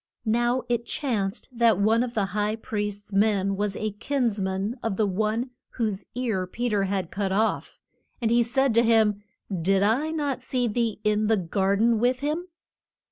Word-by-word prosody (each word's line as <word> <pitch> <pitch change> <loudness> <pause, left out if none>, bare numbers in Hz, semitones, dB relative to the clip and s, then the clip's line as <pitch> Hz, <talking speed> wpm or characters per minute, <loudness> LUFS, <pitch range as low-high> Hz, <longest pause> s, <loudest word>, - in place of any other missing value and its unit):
Now 240 +3 +1
it 235 -1 -1
chanced 210 -9 -2
that 235 -4 +3
one 220 +3 +3
of 245 -1 -3
the 205 -3 +2
high 210 +1 0
priest's 210 -3 -5
men 195 -1 +2
was 205 0 -1
a 215 0 -2
kins 230 0 -1
man 195 +6 -2
of 220 -4 -2
the 215 - +3
one 215 +6 -1 0.2
whose 215 -5 -2
ear 220 -7 -1
Pe 240 +6 -2
ter 205 -2 +1
had 190 -3 -2
cut 195 -1 -2
off. 215 +3 0 0.4
And 230 -2 0
he 240 +1 +5
said 265 +2 +2
to 230 - +5
him, 220 -3 +3 0.4
Did 195 +3 +3
I 245 +9 +2
not 290 -5 -2
see 250 -1 -1
thee 225 -1 -1
in 210 0 +2
the 220 0 +3
gar 190 +2 0
den 225 +2 +3
with 250 +3 +1
him? 310 +5 -2
220 Hz, 185 wpm, -25 LUFS, 200-240 Hz, 0.4 s, he